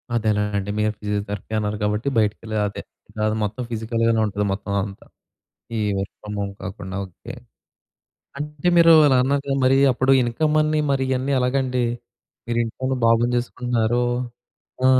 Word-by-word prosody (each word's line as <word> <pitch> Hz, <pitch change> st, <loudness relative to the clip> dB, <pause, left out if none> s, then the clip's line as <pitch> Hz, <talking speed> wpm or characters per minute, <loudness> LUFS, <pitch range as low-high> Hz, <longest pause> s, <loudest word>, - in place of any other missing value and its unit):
అదేనా 105 Hz, -2 st, +1 dB, 0.2 s
అండి. 100 Hz, +1 st, -3 dB
మీరు 105 Hz, 0 st, +2 dB
ఫిజియోథెరపీ 105 Hz, 0 st, -4 dB
అన్నారు 105 Hz, 0 st, -1 dB
కాబట్టి 105 Hz, +4 st, -1 dB
బయటకెళ్ళే 110 Hz, +1 st, 0 dB
అదే, 100 Hz, -, -6 dB, 0.4 s
కాదు 110 Hz, 0 st, +1 dB
మొత్తం 105 Hz, +4 st, -3 dB
ఫిజికల్ 115 Hz, +1 st, -2 dB
గానే 115 Hz, -1 st, +3 dB
ఉంటది. 105 Hz, 0 st, -1 dB
మొత్తం 100 Hz, 0 st, -4 dB
అంతా, 100 Hz, 0 st, -9 dB, 0.7 s
ఈ -, -, 0 dB, 0.2 s
వర్క్ 95 Hz, -, -4 dB
ఫ్రమ్ 105 Hz, 0 st, -6 dB
హోమ్ 100 Hz, 0 st, -3 dB
కాకుండా. 95 Hz, 0 st, -6 dB
ఓకె. 90 Hz, -3 st, -10 dB, 1.0 s
అంటే 150 Hz, +3 st, -3 dB
మీరు 165 Hz, -1 st, +7 dB
అలా 130 Hz, -2 st, +4 dB
అన్నాకా, 140 Hz, +1 st, -1 dB
మరి 130 Hz, +1 st, +5 dB, 0.2 s
అప్పుడు 130 Hz, +2 st, +2 dB
ఇన్కమ్ 150 Hz, +6 st, 0 dB
అన్ని, 155 Hz, 0 st, +1 dB
మరి 135 Hz, -1 st, +1 dB
ఇయన్నీ 130 Hz, +2 st, 0 dB
ఎలాగండి? 125 Hz, -1 st, 0 dB, 0.6 s
మీరు 120 Hz, -, 0 dB
ఇంట్లో 115 Hz, +3 st, -9 dB
ఉన్న 130 Hz, -, 0 dB
బాబును 115 Hz, +1 st, +3 dB
చూసుకుంటున్నారు. 120 Hz, -1 st, 0 dB, 0.8 s
ఆ! -, -, +6 dB
115 Hz, 150 wpm, -22 LUFS, 105-130 Hz, 1.0 s, మీరు